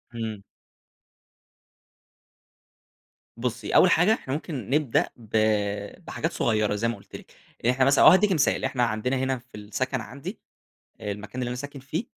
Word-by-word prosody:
إمم. 110 -3 -4 2.9
بُصِّي 120 -2 -3
أوّل 185 - +7
حاجة 180 +7 +5
إحنا 130 - -4
ممكن 145 - -5
نبدأ 145 -3 +2
ب 115 -3 -16 0.8
بحاجات - - -3
صغيّرة، 110 -2 +1
زي 115 +3 0
ما 115 - -1
قُلت - - -14
لِك، - - -11 0.3
يعني 125 +2 +2
إحنا 130 0 +3
مثلًا 140 0 +5
أو - - +12
هادِّيكِ 195 +2 +5
مثال، 155 -5 +2
إحنا 125 -2 0
عندنا 115 +3 0
هنا 130 0 0
في 120 -1 -16
السكن 115 +5 -3
عندي، 140 - -8 0.6
آآ 105 - -3
المكان 105 +5 -6
اللي 120 - -2
أنا 125 - -3
ساكن 145 +1 -7
فيه، 155 - -4
125 Hz, 160 wpm, -26 LUFS, 115-140 Hz, 2.9 s, أو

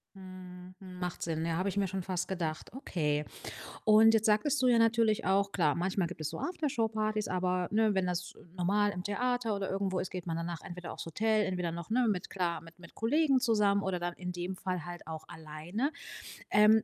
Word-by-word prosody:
Mhm, 185 -1 -10
mhm, 185 -2 -10
macht 180 -1 -4
Sinn, 160 -1 -1
ja, 165 - 0
habe 190 +2 +1
ich 205 - -4
mir 195 -1 +2
schon 190 +1 -3
fast 185 0 -2
gedacht. 165 -5 -3
Okay. 150 - -1 0.6
Und 220 +1 +7
jetzt 220 -1 +3
sagtest 250 +6 +3
du 255 - +4
ja 240 -2 +5
natürlich 225 -1 +3
auch, 200 +1 +2
klar, 155 -6 +3
manchmal 185 0 0
gibt 175 - -9
es 155 - -1
so - - -6
After-Show-Partys, 220 - -1
aber, 180 -1 0
ne, 215 -1 +3
wenn 190 -1 +2
das 180 0 -2 0.2
normal 205 +3 +2
im 180 -2 -5
Theater 235 +1 0
oder 195 -1 -2
irgendwo 190 -1 0
ist, 185 - -4
geht 180 -2 -6
man 165 - -1
danach 170 0 -4
entweder 180 -1 -7
aufs - - -6
Hotel 215 +5 +2
entweder 180 -3 -1
noch, 170 0 -6
ne, 240 +1 +3
mit, 180 -4 -1
klar 175 -3 -1
mit 165 +1 -15
mit 170 - -13
Kollegen 275 +4 +3
zusammen 210 -5 +3
oder 185 -2 -1
dann 175 0 -2
in 180 -1 -5
dem 175 +2 -4
Fall 180 -3 -3
halt 175 -2 -8
auch 160 -1 -6
alleine. 160 - -3 0.6
Ähm, 215 +1 +6
190 Hz, 210 wpm, -32 LUFS, 175-215 Hz, 0.6 s, Und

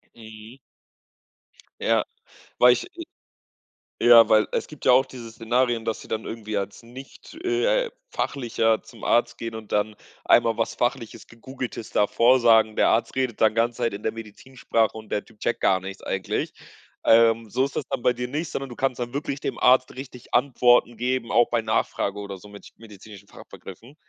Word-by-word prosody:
Mhm. 110 +2 -13 1.3
Ja, - - +2 0.5
weil 125 0 +7
ich - - -4 1.2
ja, 120 -1 +7
weil 110 -1 +4
es - - -1
gibt 150 - -12
ja - - +6
auch 130 +1 +5
diese 125 -3 -10
Szenarien, 120 +1 0
dass 110 -1 -3
sie - - -13
dann 110 0 -3
irgendwie 110 -2 -5
als 100 +2 -5
nicht, 130 +4 -13
äh, 475 +7 +1 0.2
Fachlicher 115 -4 -1
zum 115 - -16
Arzt 120 - +1
gehen 115 -1 -6
und 110 -1 -10
dann 105 +1 0 0.3
einmal 115 -2 +3
was 115 - -1
Fachliches, 120 -2 -3
Gegoogeltes 120 -1 -8
da 105 - +2
vorsagen. 115 -3 +4
Der - - +4
Arzt 115 - 0
redet 130 -4 -2
dann 110 -1 +4
ganz 115 +1 0
Zeit 120 -3 -1
in 100 - -7
der 110 - 0
Medizinsprache 115 0 -3
und 110 -1 -11
der 105 - -2
Typ 110 -2 -22
checkt 120 - -1
gar 95 - +3
nichts 95 +1 -8
eigentlich. 95 -1 -3 0.5
Ähm, 115 0 +4
so 130 +5 +1
ist 140 - -8
das - - -2
dann - - -3
bei 125 - +2
dir 125 0 -4
nicht, 150 +4 -3
sondern 135 -1 -5
du 120 - -9
kannst 130 -2 -1
dann 120 +1 -4
wirklich 140 -1 -3
dem - - -4
Arzt 130 0 +4
richtig 130 -2 -11
Antworten 120 -2 +3
geben, 125 0 -2
auch 120 0 +4
bei 120 -1 0
Nachfrage 110 -2 -1
oder 100 -1 -7
so 100 +3 -15
mit 100 0 -13
medizinischen 105 -2 -14
Fachbegriffen. 115 +9 -13
115 Hz, 180 wpm, -24 LUFS, 110-125 Hz, 1.3 s, weil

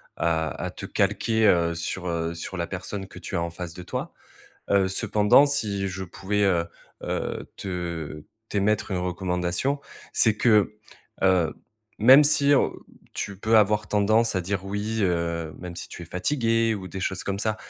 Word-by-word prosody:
à 80 -1 0
à - - -6
à - - -3
te - - -8
calquer, 110 -1 +1
heu, 85 -3 +3
sur, 90 +2 -3
heu 85 0 -2
sur 85 +3 -6
la 85 -1 -2
personne 95 +1 -6
que 90 - -12
tu - - -6
as 85 - 0
en 85 - -2
face 85 0 -7
de 90 - -9
toi. - - -5 0.6
Heu, 100 -1 +4
cependant, 105 +8 +4
si 100 -9 -1
je 95 +1 -5
pouvais, 100 +3 -2
heu 85 -3 +2 0.4
heu, - - -4
te 85 -5 -5 0.3
t'émettre 105 +1 0
une 90 - -1
recommandation, 90 +9 -1 0.3
c'est 110 -2 +4
que, 105 -3 +3 0.5
heu, 90 -4 +3 0.4
même 130 +7 +8
si, 145 -1 +4
heu, 140 - +3 0.4
tu 100 -2 -4
peux 110 +2 +3
avoir 105 0 +3
tendance 110 +1 +2
à 90 - 0
dire: 95 +1 -3
«oui», 105 +3 -3
heu, 85 -4 -1
même 90 -1 -8
si - - -7
tu 85 - -9
es - - -7
fatiguée 115 - +1
ou 95 -2 -7
des 95 - -6
choses 95 0 -2
comme 100 0 -2
ça, 110 0 0
95 Hz, 180 wpm, -25 LUFS, 85-105 Hz, 0.6 s, même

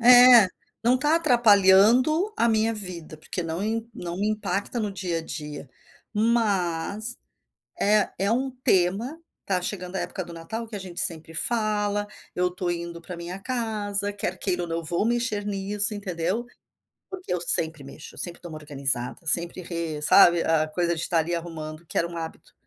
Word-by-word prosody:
É, 245 -3 +9 0.4
não 240 +2 +5
está 295 +5 +2
atrapalhando 240 - +5
a 235 - +3
minha 220 0 +2
vida 175 -6 -7
porque 175 +3 -5
não 165 +2 -4
im 225 +2 -2
não 175 0 -6
me 205 +2 0
impacta 205 +1 -2
no 210 -2 -2
dia 180 -3 -2
a - - -6
dia, 150 -3 -7 0.5
mas, 210 -1 0 0.6
é 210 0 +3
é 200 +2 +1
um 260 +3 0
tema, 195 - +2 0.3
tá 185 -2 0
chegando 180 0 -5
a - - 0
época 185 - -4
do 170 - -10
Natal 220 +8 -6
que 220 - -8
a - - -4
gente 185 -2 -7
sempre 165 -1 -3
fala, 205 +1 0 0.3
eu 180 0 +2
estou 180 0 -4
indo 170 0 -5
para 180 +1 -8
minha 175 +2 -6
casa, 205 -4 -2
quer 205 - -3
queira 180 -2 -1
ou - - -5
não 165 0 -2
vou 170 +6 -1
mexer 235 -3 0
nisso 205 +1 +2
entendeu? 190 +2 -2 0.7
Porque 375 -1 -6
eu 180 - 0
sempre 160 -3 +2
mexo, 140 +2 -8
sempre 175 -1 +1
dou 175 - -8
uma 155 - -7
organizada, 140 -1 -2
sempre 170 +3 0
re 165 -3 -4
sabe, 175 +1 +6
a 155 -1 +2
coisa 170 +2 0
de 160 - -4
estar 170 - +1
ali 170 +2 -2
arrumando 165 -1 -6
que - - -9
era 170 - +1
um 170 - -8
hábito, 160 -1 -8
190 Hz, 180 wpm, -25 LUFS, 170-215 Hz, 0.7 s, É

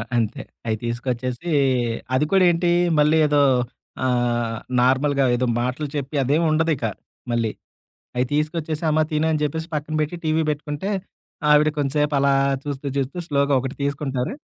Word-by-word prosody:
అంతే. 115 -1 0 0.3
అయి 110 -1 0
తీసుకొచ్చేసి 125 +5 -3 0.7
అది 150 - +2
కూడా 190 -1 +5
ఏంటి, 175 +1 +1 0.3
మళ్ళీ 150 +2 +4
ఏదో 145 -1 +3 0.6
ఆహ్, 120 -2 0 0.2
నార్మల్‌గా 135 +2 +3
ఏదో 125 +1 0 0.2
మాటలు 125 +5 -2
చెప్పి 140 +1 -4
అదేమి 150 +6 +2
ఉండది 160 +1 +2
ఇక 120 - -3 0.5
మళ్ళీ. 115 -2 0 0.7
అయి 125 - +2
తీసుకొచ్చేసి, 155 +1 -1
అమ్మా 155 +1 +3
తిను 155 +1 +1
అని 155 -1 0
చెప్పేసి 160 +2 -2
పక్కన 155 +1 -3
పెట్టి 150 +3 -2
టీవీ 160 +1 +2
బెట్టుకుంటే. 150 +5 -3 0.6
ఆవిడ 150 +1 +6
కొంసేపు 145 +1 +1
అలా 140 0 +3 0.3
చూస్తూ, 140 -1 -5
చూస్తూ 135 +5 -2
స్లోగా 140 -1 +1
ఒకటి 135 +2 -5
తీసుకుంటారు, 140 - -2
145 Hz, 145 wpm, -22 LUFS, 130-155 Hz, 0.7 s, ఆవిడ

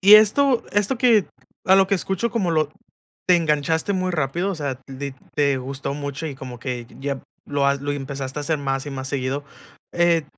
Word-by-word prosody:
Y 200 +2 +9
esto 240 +5 +5
esto 205 +5 +2
que 230 -6 +5 0.4
a 190 +1 +6
lo 195 -1 +5
que 200 - +2
escucho, 195 +4 -1
como 200 -7 0
lo 155 -2 +1 0.6
te 180 -1 +6
enganchaste 160 +3 +1
muy 185 -1 0
rápido, 170 +4 0
o 195 - -2
sea, 140 -4 -3
lit 135 0 -6 0.2
te 140 -2 +2
gustó 135 +2 -4
mucho 145 +2 -4
y 145 - -4
como 130 -2 -8
que 120 -1 -4
ya 140 -1 -2 0.3
lo 140 -1 +1
has 140 0 +2
lo 145 0 -2
empezaste 135 0 -4
a - - -3
hacer 155 +1 0
más 135 -1 -1
y - - -4
más 130 -1 -5
seguido, 140 +1 -2 0.5
eh, 170 -2 +3
145 Hz, 200 wpm, -23 LUFS, 135-185 Hz, 0.6 s, Y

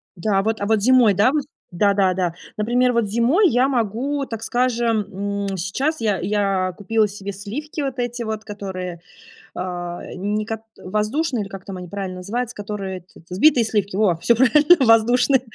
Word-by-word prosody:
да 195 +2 +1
вот, 220 0 -1
а - - 0
вот 220 -1 +2
зимой, 245 -3 +5
да 210 +7 +3
вот 295 -2 0 0.3
Да, 200 +3 +2
да, 190 -2 +2
да. 180 -2 -1 0.2
Например, 245 +3 +2
вот 235 -3 +1
зимой 255 - +3
я 250 +3 +3
могу, 265 +4 -1
так 225 -3 -6
скажем, 235 -3 0 0.5
м, 190 - -4
сейчас 265 - -1
я 210 -4 +1
я 195 -1 0
купила 215 +1 +1
себе 200 0 -7
сливки 270 +11 -6
вот 270 -2 -3
эти 240 0 -2
вот, 220 -1 -4
которые, 185 -4 -6 0.6
э, - - -3 0.5
не 205 +3 -2
кот 225 0 -5 0.2
воздушные, 220 - -1
или - - -9
как 195 -1 -9
там 190 -2 -7
они 180 -1 -8
правильно 195 -2 -5
называются, 235 +6 -4
которые, 200 -2 -5
этот, 175 0 -20
взбитые 240 +6 +4
сливки, 205 -3 -1
во! 190 -6 +2
Всё 235 +7 +3
правильно, 295 +5 +5
воздушные. 245 +4 +4
215 Hz, 180 wpm, -21 LUFS, 195-245 Hz, 0.6 s, зимой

